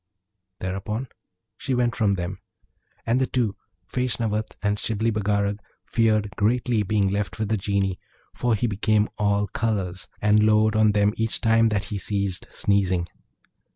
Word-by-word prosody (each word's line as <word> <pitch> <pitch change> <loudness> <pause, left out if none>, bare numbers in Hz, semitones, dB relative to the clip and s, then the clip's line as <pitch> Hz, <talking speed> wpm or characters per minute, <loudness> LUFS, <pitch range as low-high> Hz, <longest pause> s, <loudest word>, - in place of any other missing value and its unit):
Thereupon, 105 +6 -4 0.5
she 135 -2 -1
went 120 -1 +1
from 105 -3 +2
them; 95 +1 -4 0.7
and 120 +3 +2
the 130 - +2
two, 115 -6 0 0.3
Feshnavat 110 -1 -2
and 105 0 +1
Shibli 115 +1 0
Bagarag, 100 -1 0 0.3
feared 110 -3 +1
greatly 115 +1 +1
being 100 0 +1
left 100 +2 -2
with 110 -2 -2
the 110 - +2
Genie, 95 -1 -1 0.3
for 120 -2 +1
he 115 - -1
became 110 0 +1
all 100 0 +2
colours, 100 -4 -2
and 105 0 +4
loured 110 0 +4
on 110 -1 +4
them 105 0 +3
each 110 0 0
time 115 0 +4
that 105 -2 0
he 100 - -2
ceased 100 -3 -2
sneezing. 95 -3 +1
105 Hz, 150 wpm, -24 LUFS, 100-110 Hz, 0.7 s, and